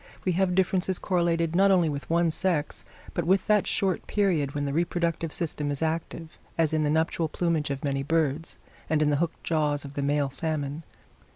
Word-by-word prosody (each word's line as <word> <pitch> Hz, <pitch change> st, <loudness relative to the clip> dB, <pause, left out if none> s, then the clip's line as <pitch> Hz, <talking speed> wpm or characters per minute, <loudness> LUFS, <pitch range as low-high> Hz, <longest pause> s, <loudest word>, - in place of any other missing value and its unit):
We 185 Hz, -, +2 dB
have 180 Hz, 0 st, +1 dB
differences 185 Hz, 0 st, +1 dB
correlated 170 Hz, -3 st, 0 dB
not 195 Hz, +2 st, +5 dB
only 180 Hz, -4 st, +4 dB
with 145 Hz, -1 st, -4 dB
one 170 Hz, 0 st, +2 dB
sex, 160 Hz, -3 st, -1 dB, 0.3 s
but 175 Hz, -, -1 dB
with 185 Hz, +3 st, +2 dB
that 210 Hz, -2 st, +3 dB
short 190 Hz, -2 st, 0 dB
period 170 Hz, -9 st, +1 dB
when 145 Hz, 0 st, -1 dB
the 140 Hz, -, -2 dB
reproductive 170 Hz, 0 st, -1 dB
system 150 Hz, -3 st, -2 dB
is 145 Hz, +2 st, -2 dB
active, 160 Hz, 0 st, -4 dB, 0.2 s
as 160 Hz, -2 st, +2 dB
in 155 Hz, -, +2 dB
the 150 Hz, -, +1 dB
nuptial 160 Hz, +1 st, +1 dB
plumage 165 Hz, -3 st, 0 dB
of 140 Hz, -1 st, -4 dB
many 140 Hz, -1 st, -1 dB
birds, 155 Hz, +1 st, -1 dB, 0.3 s
and 155 Hz, -1 st, +2 dB
in 150 Hz, -, +2 dB
the 145 Hz, -, +2 dB
hooked 170 Hz, +2 st, -2 dB
jaws 150 Hz, -3 st, +1 dB
of 140 Hz, -, -9 dB
the 145 Hz, -, -3 dB
male 140 Hz, 0 st, +1 dB
salmon. 150 Hz, 0 st, -3 dB
160 Hz, 195 wpm, -27 LUFS, 145-175 Hz, 0.3 s, not